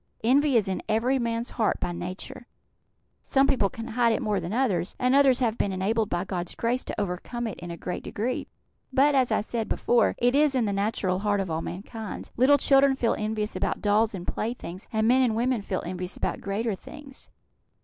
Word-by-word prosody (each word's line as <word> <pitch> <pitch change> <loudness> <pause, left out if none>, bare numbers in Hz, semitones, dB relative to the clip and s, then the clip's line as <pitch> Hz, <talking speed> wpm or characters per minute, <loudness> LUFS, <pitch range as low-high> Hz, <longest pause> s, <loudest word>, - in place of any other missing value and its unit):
Envy 270 +2 +4
is 210 - +1
in 190 - -2
every 240 +5 +2
man's 235 0 -2
heart 225 -3 0
by 175 - -2
nature. 185 +9 -7 0.7
Some 270 0 +3
people 250 -8 +2
can 225 +3 -7
hide 235 0 +2
it - - -1
more 210 -2 0
than 170 +1 -5
others, 205 -8 0
and 250 +1 +2
others 270 -2 +5
have 230 -2 0
been 200 - +1
enabled, 210 +3 0
by 175 0 -1
God's 175 -2 -4
grace, 240 +2 0
to - - -4
overcome 205 +5 -3
it 220 - -5
in 175 - -7
a 170 - -6
great 180 - -4
degree; 240 +5 -3 0.4
but, 280 +2 +4
as 260 -4 +2
I 215 - +2
said 225 +1 -3
before, 235 -2 +2
it 245 +1 +2
is 290 -1 +3
in 245 -3 +2
the 200 - -1
natural 195 -2 0
heart 205 0 +1
of 190 -3 -2
all 160 +1 -1
mankind. 210 +4 -7
Little 270 +4 +5
children 275 0 +4
feel 235 -3 +1
envious 215 0 -2
about - - -2
dolls 210 +1 +2
and 180 -2 -7
playthings, 210 -5 -4
and 220 0 +1
men 255 +2 +5
and 240 -4 +2
women 245 0 +1
feel 195 -2 -3
envious 180 +1 -5
about - - -2
greater 210 +3 -1
things." 275 +7 -11
225 Hz, 210 wpm, -26 LUFS, 195-250 Hz, 0.7 s, others